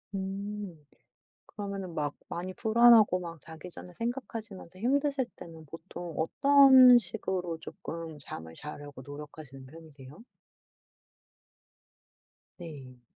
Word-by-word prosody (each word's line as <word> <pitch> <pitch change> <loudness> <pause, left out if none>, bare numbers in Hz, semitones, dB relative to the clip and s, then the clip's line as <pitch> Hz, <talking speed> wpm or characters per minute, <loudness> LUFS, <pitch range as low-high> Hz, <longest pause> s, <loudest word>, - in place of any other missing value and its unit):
음. 195 -3 -5 0.6
그러면은 195 -4 -6
막 145 -2 -2
많이 185 +2 -5
불안하고 225 -3 +5
막 170 -2 -7
자기 160 +4 -11
전에 180 +1 -11
생각하시면서 225 -6 -6
힘드실 275 +3 +1
때는 160 -2 -11
보통 165 +2 -9
어떤 265 - +7
식으로 180 -4 -2
쪼끔 165 -1 -8
잠을 80 - -8
자려고 145 - -9
노력하시는 145 -1 -10
편이세요? 150 +1 -14 2.4
네. 135 -8 -10
175 Hz, 235 characters per minute, -29 LUFS, 150-215 Hz, 2.4 s, 어떤